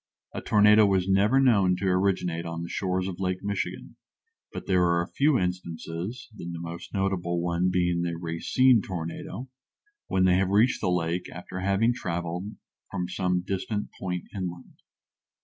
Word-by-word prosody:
A - - -4
tornado 105 0 +6
was 95 -2 +1
never 100 +7 +4
known 100 -9 +4
to 95 +2 -4
originate 90 -3 +1
on 85 0 -5
the 85 - -6
shores 95 -1 -1
of 95 -2 -6
Lake 95 0 -2
Michigan, 100 0 -4 0.5
but - - -7
there 90 -2 +3
are 85 0 +2
a - - -8
few 145 -1 +3
instances 90 +4 -4
(the 85 - -8
most 85 0 -7
notable 95 -3 -1
one 85 +1 +1
being 90 -1 +1
the 85 -1 -2
Racine 100 +9 +3
tornado) 90 +8 -5 0.6
when 95 0 +2
they 90 -1 +5
have 95 0 +1
reached 105 +6 +3
the - - +1
lake 90 0 -1
after 90 +2 -7
having 100 +5 +2
traveled 90 -1 -4 0.3
from 90 0 -3
some 90 0 0
distant 100 +2 -3
point 90 -2 -4
inland. 90 -4 -6
90 Hz, 160 wpm, -27 LUFS, 85-100 Hz, 0.6 s, tornado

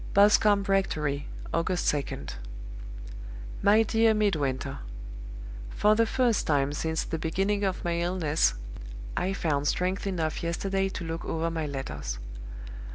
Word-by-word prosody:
"Boscombe 205 0 +6
Rectory, 155 -8 0 0.3
August 175 +1 +2
2d. 145 -3 -3 1.3
"MY 215 +2 +6
DEAR 225 0 +4
MIDWINTER 155 -11 0 0.9
For 210 - +4
the 225 +1 +3
first 240 -2 +2
time 145 -1 +2
since 160 +2 -1
the 165 - -3
beginning 195 +6 0
of 190 -3 -1
my 170 0 +1
illness, 170 - +2 0.6
I 190 +2 0
found 145 -6 0
strength 185 +5 0
enough 165 -5 -1
yesterday 195 +3 0
to 190 - -5
look 165 0 -4
over 165 +1 -1
my 160 -2 -2
letters. 135 - -4
175 Hz, 125 wpm, -28 LUFS, 155-200 Hz, 1.3 s, Boscombe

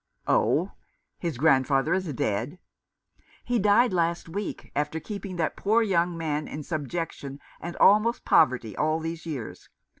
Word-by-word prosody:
" - - -42
Oh? - - +2 0.5
His 170 -7 -3
grandfather 135 -1 +3
is 185 -4 -1
dead? 120 - -2 0.4
" - - -33
"He 245 -1 +1
died 210 +3 +4
last 170 -1 0
week, 195 +5 -5
after 150 +2 -1
keeping 200 +1 -6
that 165 -2 -1
poor 220 +3 +2
young 175 -4 +1
man 155 -2 -2
in 150 - -6
subjection, 150 -2 -4 0.2
and 175 +1 -6
almost 215 +4 +4
poverty, 120 -5 +3
all 155 +1 +1
these 165 +1 -5
years. 135 -8 -6
165 Hz, 150 wpm, -26 LUFS, 145-190 Hz, 0.5 s, died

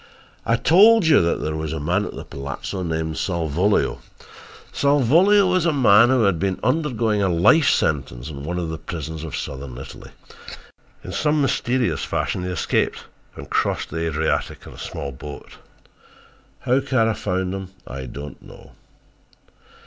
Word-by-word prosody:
"I 115 - +3
told 205 - +5
you 160 - +5
that 85 0 0
there 75 0 -2
was 80 -1 -4
a 80 - -3
man 90 +7 0
at - - -7
the - - -8
palazzo 70 +7 -6
named 80 -2 -3
Salvolio. 85 +3 0 0.7
Salvolio 155 - +4
was 180 -2 +2
a - - +3
man 120 -5 +5
who 130 -3 +3
had 100 -5 +2
been 95 +1 -1
undergoing 120 -6 0
a 95 - +2
life 90 - +4
sentence 65 -4 -1
in 70 -3 -8
one 90 +4 -3
of 85 -2 -3
the 80 -1 -5
prisons 80 -1 -6
of 80 -4 -5
southern 65 -2 -6
Italy. 65 - -10 0.9
In - - -7
some 150 0 +1
mysterious 130 -2 0
fashion 90 - -2
he 90 - -3
escaped 90 - -1 0.3
and - - -8
got - - -15
across - - 0
the 80 +1 -3
Adriatic 80 0 -2
in - - -11
a - - -14
small 70 - -5
boat. 70 +3 -10 1.0
How 130 +1 +2
Kara 125 -5 +1
found 95 -2 -2
him 95 -1 -6 0.2
I 65 -1 -7
don't 70 +3 -9
know. - - -15
90 Hz, 165 wpm, -22 LUFS, 80-130 Hz, 1.0 s, told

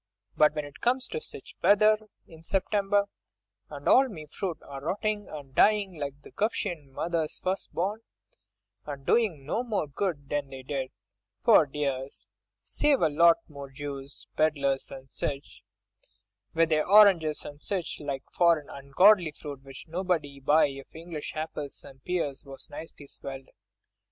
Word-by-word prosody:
But 150 0 +4
when 150 -1 -2
it 145 - -12
comes 255 +2 +2
to 465 - -4
sich 485 0 -10
wet 205 0 +5
weather 215 0 +4 0.2
in 160 -1 -15
September, 200 +3 +1 0.6
and - - -7
all 265 0 +6
me 160 -8 -8
fruit 170 +3 -4
a 135 -1 -8
rottin' 205 +6 -2
and 145 -3 -9
a - - -28
dyin' 200 -1 +3
like 140 -1 -5
the - - -13
'Guptian 175 -8 -2
mother's 165 +2 -2
first 190 +1 -3
born, 205 +6 -2 0.9
and 140 -2 -6
doin' 185 -13 +2
no 220 - -1
more 220 -9 -1
good 145 -1 -3
than 145 -1 -2
they 135 -1 -9
did, 130 -1 -3 0.5
pore 150 - +6
dears, 135 -1 -4 0.4
save 295 -2 +2
to 170 - +2
a - - +3
lot 170 +3 +6
of 140 -3 -10
Jews, 140 -1 -7
pedlars 140 -3 +1
and 135 0 -10
sich, 140 0 -5 0.9
with 165 0 +4
their 155 -1 +2
oranges 190 -7 +6
and 145 0 -9
sich 190 -4 -3
like 140 -2 -4
foreign 170 -4 +3
ungodly 170 +7 +4
fruit, 145 -2 -8
which 135 +3 -11
nobody'd 160 -5 -2
buy 155 +3 +5
if 135 +2 -11
English 160 -2 -6
apples 155 -2 -5
and 135 -1 -14
pears 170 -7 -2
was 135 -1 -10
nicely 155 -1 -9
swelled. 135 -1 -9
155 Hz, 160 wpm, -28 LUFS, 140-190 Hz, 0.9 s, all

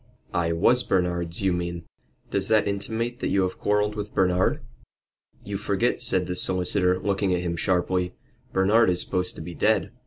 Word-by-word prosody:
"I 85 -1 +1
was 110 +9 +3
Bernard's, 90 -4 0
you 95 -2 +2
mean." 85 -1 -3 0.5
"Does 100 0 0
that 110 -2 +3
intimate 115 +4 -2
that - - -1
you 95 - +2
have 95 - -3
quarrelled 105 0 +1
with 105 0 -6
Bernard?" 90 -1 +2 0.8
"You - - -4
forget," - - 0
said - - 0
the 90 - -3
solicitor, 90 0 +1
looking 95 -1 0
at 90 - -1
him 85 -1 -2
sharply. 90 0 0 0.4
"Bernard 105 +4 +4
is 90 -1 +1
supposed 90 -1 -1
to - - -8
be 85 +1 -7
dead." - - +1
95 Hz, 175 wpm, -25 LUFS, 90-100 Hz, 0.8 s, Bernard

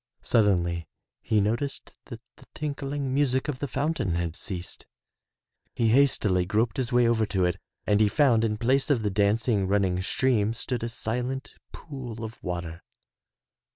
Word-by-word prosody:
Suddenly 85 -6 +2 0.3
he 110 - +1
noticed 115 +7 -2
that 120 -3 -9 0.2
the - - -18
tinkling 140 -2 -3
music 135 -1 +1
of 140 -4 -3
the 145 - -2
fountain 140 - -1
had 85 -1 -2
ceased. 90 -1 -6 0.9
He 115 -2 +2
hastily 110 -8 +3
groped 110 +5 0
his 130 -1 -1
way 120 -1 +4
over 110 -2 +2
to 95 -3 +1
it 90 - 0 0.3
and 105 0 +3
he 105 -1 +4
found 120 -4 +3
in 105 -2 0
place 130 +6 +2
of 125 -6 +2
the 105 - 0
dancing, 105 0 +2
running 95 -2 +1
stream 115 +1 +1
stood 120 +1 -2
a 115 - -2
silent 125 +4 -3 0.2
pool 125 -7 -8
of 110 +1 -8
water. 85 -2 -4
115 Hz, 155 wpm, -27 LUFS, 100-130 Hz, 0.9 s, way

